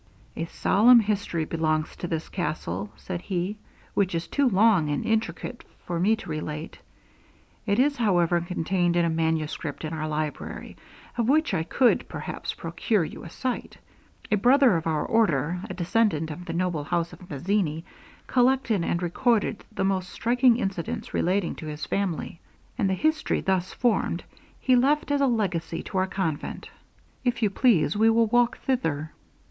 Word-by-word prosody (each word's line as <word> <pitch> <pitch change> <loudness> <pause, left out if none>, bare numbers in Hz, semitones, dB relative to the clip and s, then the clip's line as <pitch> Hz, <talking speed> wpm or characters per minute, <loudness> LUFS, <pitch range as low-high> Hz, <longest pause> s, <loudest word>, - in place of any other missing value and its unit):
'A 165 - -2
solemn 230 +8 +5
history 200 -6 -1
belongs 155 -1 -1
to 175 - -5
this 165 -1 -3
castle, 105 - -3
said 180 -2 -5
he, 185 +2 -2 0.4
'which 190 -3 +1
is 165 0 -2
too 280 -3 +2
long 195 -6 +4
and 145 - -1
intricate 225 +2 -2 0.2
for 175 -1 -2
me 210 +5 +3
to 220 - -11
relate. 155 0 -5 0.9
It 200 0 +2
is, 285 +2 +3
however, 175 -6 +2
contained 175 0 0
in 175 -1 +3
a 165 - +1
manuscript 160 -2 -2
in 155 - -4
our 155 -1 -3
library, 155 -1 -4 0.4
of 235 +1 +2
which 315 +3 +3
I - - +1
could, 240 +9 +2
perhaps, - - -5
procure 215 -7 0
you - - -9
a 170 - -8
sight. 255 +8 -4 0.5
A 210 - +4
brother 250 0 +5
of 165 0 -1
our 155 -2 0
order, 175 - +1
a - - -4
descendant 180 -3 +1
of 175 +4 -8
the 165 - -4
noble 170 -4 -1
house 170 0 -1
of 180 - -13
Mazzini, 165 +1 -1 0.4
collected 250 -6 +2
and 170 +1 -1
recorded 220 +4 +1
the - - -2
most 190 -1 0
striking 245 +2 +3
incidents 195 -8 -3
relating 185 +1 +1
to 155 - -7
his 150 0 -5
family, 180 -4 -2 0.4
and 205 -6 +1
the 190 - +1
history 310 - +1
thus 185 -1 0
formed, 240 -2 0 0.4
he 255 - +3
left 285 +4 +2
as 285 0 +2
a 275 - +4
legacy 190 -9 -1
to 190 - -2
our 185 - +1
convent. 175 -6 -3 0.5
If 245 -2 0
you 205 - +3
please, 195 - +3
we 220 +2 +4
will 230 0 +4
walk 240 +2 +2
thither.' 160 - -1
185 Hz, 165 wpm, -26 LUFS, 165-230 Hz, 0.9 s, solemn